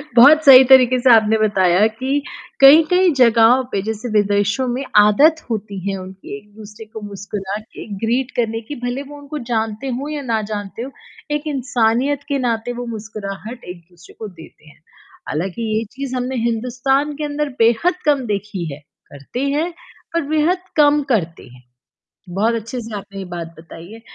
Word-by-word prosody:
बहुत 295 Hz, +6 st, +7 dB
सही 265 Hz, -1 st, +10 dB
तरीके 255 Hz, -1 st, +6 dB
से 255 Hz, +1 st, +3 dB
आपने 220 Hz, -1 st, +4 dB
बताया 195 Hz, -2 st, +3 dB
कि 260 Hz, +6 st, -2 dB, 0.4 s
कई-कई 325 Hz, +6 st, +6 dB
जगहों 235 Hz, +2 st, +5 dB
पे, 195 Hz, -, -1 dB
जैसे 220 Hz, +3 st, -5 dB
विदेशों 205 Hz, +4 st, +1 dB
में 250 Hz, +3 st, -2 dB, 0.2 s
आदत 300 Hz, +10 st, +4 dB
होती 205 Hz, -3 st, -4 dB
है 195 Hz, -, -3 dB
उनकी 190 Hz, +2 st, -9 dB
एक-दूसरे 210 Hz, +1 st, -13 dB
को 220 Hz, 0 st, -10 dB
मुस्कुरा 200 Hz, 0 st, -5 dB
के 215 Hz, -, -12 dB, 0.2 s
ग्रीट 245 Hz, +3 st, -1 dB
करने 225 Hz, -1 st, -1 dB
की, 295 Hz, -, -4 dB
भले 245 Hz, +2 st, -3 dB
वो 290 Hz, +1 st, -12 dB
उनको 285 Hz, +1 st, -7 dB
जानते 220 Hz, +2 st, -2 dB
हों 290 Hz, +2 st, -5 dB
या 295 Hz, -1 st, -4 dB
ना 220 Hz, -, +1 dB
जानते 205 Hz, +2 st, -6 dB
हों, 265 Hz, -, -6 dB, 0.4 s
एक 295 Hz, +1 st, -2 dB
इंसानियत 255 Hz, +2 st, 0 dB
के 280 Hz, -, 0 dB
नाते 230 Hz, +1 st, -2 dB
वो -, -, -5 dB
मुस्कुराहट 215 Hz, +2 st, -8 dB
एक-दूसरे 175 Hz, 0 st, -19 dB
को 220 Hz, -, -5 dB
देते 155 Hz, -1 st, -17 dB
हैं। 150 Hz, -, -22 dB, 0.5 s
हालाँकि 185 Hz, +8 st, -3 dB, 0.2 s
ये 225 Hz, -, -1 dB
चीज़ 265 Hz, -1 st, -5 dB
हमने 255 Hz, +1 st, -3 dB
हिंदुस्तान 255 Hz, +5 st, -1 dB
के 305 Hz, -, -4 dB
अंदर 295 Hz, 0 st, -2 dB
बेहद 235 Hz, +10 st, +3 dB
कम 285 Hz, -4 st, +2 dB
देखी 205 Hz, -4 st, -4 dB
है, 140 Hz, -, -10 dB, 0.3 s
करते 140 Hz, -, -8 dB, 0.2 s
हैं 335 Hz, +4 st, -1 dB, 0.4 s
पर 335 Hz, -, +1 dB
बेहद 310 Hz, +4 st, +2 dB, 0.2 s
कम 295 Hz, -1 st, +4 dB
करते 170 Hz, -7 st, -2 dB
हैं, 125 Hz, 0 st, -18 dB, 0.7 s
बहुत 225 Hz, +3 st, +1 dB
अच्छे-से 230 Hz, 0 st, -6 dB
आपने 200 Hz, 0 st, -9 dB
ये 190 Hz, -, -5 dB
बात 170 Hz, -2 st, -7 dB
बताई 165 Hz, +1 st, -12 dB
है। 225 Hz, -, -11 dB
230 Hz, 170 wpm, -19 LUFS, 205-270 Hz, 0.7 s, सही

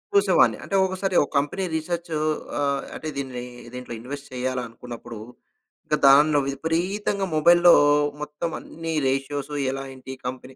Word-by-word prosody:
చూసేవాడిని 400 Hz, -, +4 dB
అంటే 195 Hz, -, -3 dB
ఒకసారి 190 Hz, 0 st, -2 dB
ఒక 145 Hz, -, -1 dB
కంపెనీ 145 Hz, +7 st, 0 dB
రిసెర్చ్ 170 Hz, +1 st, -3 dB, 0.5 s
ఆహ్, 140 Hz, -1 st, 0 dB
అంటే 155 Hz, -, -5 dB
దీని 130 Hz, -3 st, -4 dB, 0.3 s
దీంట్లో 125 Hz, -1 st, -7 dB
ఇన్వెస్ట్ 140 Hz, +3 st, -7 dB
చేయాలనుకున్నప్పుడు 120 Hz, -2 st, -5 dB, 0.7 s
ఇంక 150 Hz, -, +1 dB
దాన్లో 145 Hz, +2 st, +6 dB
విపరీతంగా 180 Hz, +7 st, -1 dB
మొబైల్‌లో 175 Hz, +2 st, +7 dB, 0.5 s
మొత్తం 150 Hz, +3 st, -4 dB
అన్ని 165 Hz, 0 st, -6 dB
రేషియోస్ 135 Hz, +2 st, -2 dB, 0.2 s
ఎలా 135 Hz, 0 st, -4 dB
ఏంటి 130 Hz, 0 st, -10 dB
ఈ -, -, -41 dB
కంపెనీ 130 Hz, +1 st, -7 dB
145 Hz, 130 wpm, -24 LUFS, 130-170 Hz, 0.7 s, మొబైల్‌లో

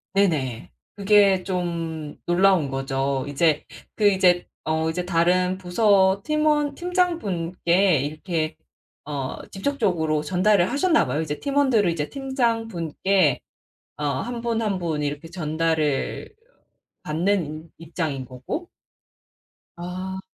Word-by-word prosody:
네네. 150 Hz, -, 0 dB, 0.2 s
그게 200 Hz, -2 st, +4 dB
좀 165 Hz, -4 st, -3 dB
놀라운 175 Hz, -3 st, +3 dB
거죠. 135 Hz, 0 st, -1 dB
이제 150 Hz, +2 st, +1 dB, 0.3 s
그 210 Hz, -, +3 dB
이제 180 Hz, -2 st, +3 dB, 0.2 s
어 160 Hz, +1 st, 0 dB
이제 175 Hz, +2 st, -3 dB
다른 180 Hz, +1 st, +2 dB
부서 190 Hz, +1 st, +3 dB
팀원 300 Hz, -1 st, +1 dB
팀장분께 195 Hz, -, +1 dB
이렇게 155 Hz, +2 st, -3 dB, 0.5 s
어 140 Hz, -3 st, -5 dB
직접적으로 190 Hz, -, 0 dB
전달을 185 Hz, +4 st, +2 dB
하셨나 320 Hz, +4 st, +3 dB
봐요. 150 Hz, -, -2 dB
이제 150 Hz, -2 st, -4 dB
팀원들을 265 Hz, -9 st, +2 dB
이제 155 Hz, -3 st, -2 dB
팀장분께 225 Hz, -, 0 dB, 0.6 s
어 150 Hz, -, -5 dB, 0.2 s
1 240 Hz, -1 st, -5 dB
분 230 Hz, -1 st, -1 dB
1 200 Hz, -4 st, -1 dB
분 160 Hz, -4 st, -2 dB
이렇게 145 Hz, +2 st, -4 dB
전달을 160 Hz, -3 st, -1 dB, 0.7 s
받는 175 Hz, +5 st, 0 dB
인 155 Hz, +2 st, -9 dB
입장인 160 Hz, -5 st, -4 dB
거고 130 Hz, -, -6 dB, 1.1 s
아. 185 Hz, +2 st, -5 dB
180 Hz, 220 characters per minute, -24 LUFS, 155-205 Hz, 1.1 s, 그게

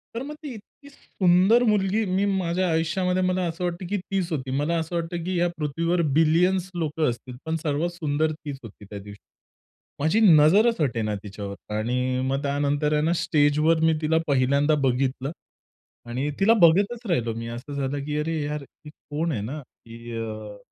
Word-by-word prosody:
तर 230 Hz, -, -3 dB
मग 295 Hz, +2 st, -7 dB
ती 285 Hz, -4 st, -6 dB
इतकी 235 Hz, +6 st, -15 dB
सुंदर 190 Hz, -2 st, +3 dB
मुलगी 210 Hz, -1 st, +2 dB
मी 190 Hz, +1 st, +1 dB
माझ्या 185 Hz, -2 st, 0 dB
आयुष्यामध्ये 180 Hz, +3 st, 0 dB
मला 185 Hz, 0 st, +1 dB
असं 165 Hz, +2 st, -6 dB
वाटतं 175 Hz, +1 st, -3 dB
की 205 Hz, -, 0 dB
तीच 190 Hz, -1 st, -3 dB
होती. 130 Hz, -4 st, -3 dB
मला 155 Hz, +4 st, 0 dB
असं 165 Hz, +2 st, -4 dB
वाटतं 170 Hz, 0 st, -3 dB
की 185 Hz, 0 st, -2 dB
या 175 Hz, -, +3 dB
पृथ्वीवर 165 Hz, +4 st, 0 dB, 0.2 s
बिलियन्स 175 Hz, +4 st, +3 dB
लोकं 155 Hz, -3 st, 0 dB
असतील 125 Hz, +1 st, -7 dB
पण 160 Hz, 0 st, -1 dB
सर्वात 150 Hz, +3 st, 0 dB
सुंदर 155 Hz, -2 st, -1 dB
तीच 150 Hz, -2 st, -7 dB
होती 105 Hz, -2 st, -12 dB
त्या 100 Hz, +1 st, -8 dB
दिवशी. 100 Hz, +1 st, -11 dB, 0.8 s
माझी 160 Hz, +9 st, +2 dB
नजरच 195 Hz, +4 st, +5 dB
हटे 120 Hz, -6 st, 0 dB
ना 105 Hz, -1 st, -1 dB
तिच्यावर 100 Hz, 0 st, -8 dB
आणि 125 Hz, +3 st, -1 dB
मग 135 Hz, +1 st, -1 dB
त्यानंतर 145 Hz, +1 st, 0 dB
आहे 150 Hz, -, +2 dB
ना, 165 Hz, +3 st, +2 dB
स्टेजवर 155 Hz, 0 st, +2 dB
मी 160 Hz, 0 st, +4 dB
तिला 160 Hz, +1 st, +2 dB
पहिल्यांदा 140 Hz, +2 st, +3 dB
बघितलं 130 Hz, +1 st, 0 dB, 0.8 s
आणि 130 Hz, +5 st, -2 dB
तिला 205 Hz, +3 st, +5 dB
बघतच 200 Hz, +8 st, +4 dB
राहिलो 120 Hz, -9 st, 0 dB
मी 115 Hz, 0 st, -5 dB
असं 120 Hz, +5 st, -7 dB
झालं 140 Hz, 0 st, -2 dB
की 150 Hz, 0 st, -2 dB
अरे 160 Hz, +1 st, -1 dB
यार 150 Hz, 0 st, -3 dB
ही 150 Hz, +2 st, -15 dB
कोण 155 Hz, +2 st, -4 dB
आहे 115 Hz, -8 st, -2 dB
ना? 130 Hz, +9 st, -5 dB
की 115 Hz, -2 st, -13 dB
अ, 110 Hz, -2 st, -6 dB
155 Hz, 180 wpm, -25 LUFS, 135-180 Hz, 0.8 s, नजरच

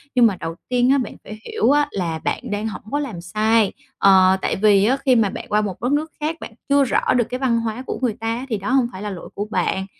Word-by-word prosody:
Nhưng 245 Hz, -, +6 dB
mà 210 Hz, -4 st, +3 dB
đầu 165 Hz, 0 st, -5 dB
tiên 250 Hz, 0 st, +2 dB
á 280 Hz, -, +4 dB
bạn 250 Hz, -5 st, -3 dB
phải 215 Hz, +1 st, -9 dB
hiểu 445 Hz, -10 st, +1 dB
á 290 Hz, 0 st, +3 dB
là 170 Hz, -4 st, -3 dB
bạn 245 Hz, +7 st, -3 dB
đang 205 Hz, +2 st, -2 dB
hổng 220 Hz, -, -6 dB
có 290 Hz, -, 0 dB
làm 225 Hz, -12 st, -5 dB
sai, 215 Hz, +4 st, +2 dB, 0.3 s
ờ, 190 Hz, -1 st, +5 dB
tại -, -, 0 dB
vì 200 Hz, -1 st, +4 dB
á 260 Hz, +5 st, +2 dB
khi 255 Hz, -2 st, +5 dB
mà 220 Hz, -3 st, +3 dB
bạn -, -, -7 dB
qua 210 Hz, 0 st, +2 dB
một 200 Hz, -1 st, -5 dB
đất 245 Hz, -, 0 dB
nước 305 Hz, +2 st, 0 dB
khác 310 Hz, +2 st, -2 dB
bạn 225 Hz, -, -9 dB, 0.2 s
chưa 280 Hz, 0 st, +5 dB
rõ 255 Hz, -, +1 dB
được 240 Hz, -, +3 dB
cái 250 Hz, -, -4 dB
văn 240 Hz, -3 st, +1 dB
hóa 230 Hz, +2 st, -3 dB
của -, -, -4 dB
người 245 Hz, -4 st, +1 dB
ta 225 Hz, -, -4 dB
á, 255 Hz, -, -6 dB
thì 220 Hz, -, -1 dB
đó 200 Hz, +3 st, -5 dB
hông 260 Hz, -3 st, +3 dB
phải 185 Hz, -, -9 dB
là 210 Hz, -, -4 dB
lỗi 185 Hz, -3 st, -8 dB
của 205 Hz, -, -3 dB
bạn. 190 Hz, 0 st, 0 dB
225 Hz, 280 wpm, -21 LUFS, 200-255 Hz, 0.3 s, Nhưng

